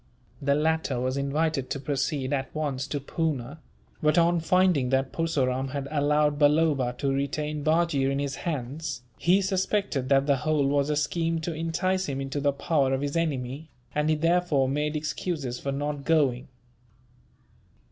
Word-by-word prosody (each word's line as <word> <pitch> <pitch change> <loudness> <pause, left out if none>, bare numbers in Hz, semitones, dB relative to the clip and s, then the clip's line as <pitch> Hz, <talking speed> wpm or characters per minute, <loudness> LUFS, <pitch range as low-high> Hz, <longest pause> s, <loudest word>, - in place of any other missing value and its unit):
The 140 0 +2
latter 155 -4 0
was 130 +1 -1
invited 140 0 -1
to 140 - -2
proceed 135 0 -1
at 135 0 -3
once 140 -3 -2
to 145 +1 -2
Poona; 145 -1 -3 0.4
but 155 +2 +3
on 170 0 +4
finding 170 -5 +3
that 135 0 +1
Purseram 135 -5 0
had 140 -1 -3
allowed 150 0 +2
Balloba 145 -4 +3
to 135 0 0
retain 150 +2 -2
Bajee 155 -3 +2
in 135 - -1
his 140 -1 -2
hands, 145 -3 -4 0.2
he 190 +3 +3
suspected 190 -7 0
that 135 0 +4
the 140 -1 +3
whole 150 +1 +1
was 140 +1 +1
a 150 - +1
scheme 165 +2 0
to 165 +1 -3
entice 175 +3 -1
him 135 -1 -3
into 135 +1 -3
the 140 0 +3
power 140 -1 +1
of 135 - -3
his 145 +1 -2
enemy, 145 -2 -2 0.2
and 150 +1 +1
he 155 - +3
therefore 165 -4 +2
made 150 +3 -1
excuses 150 -4 -3
for 140 - -3
not 145 +1 -3
going. 140 -5 +2
145 Hz, 165 wpm, -27 LUFS, 135-160 Hz, 0.4 s, on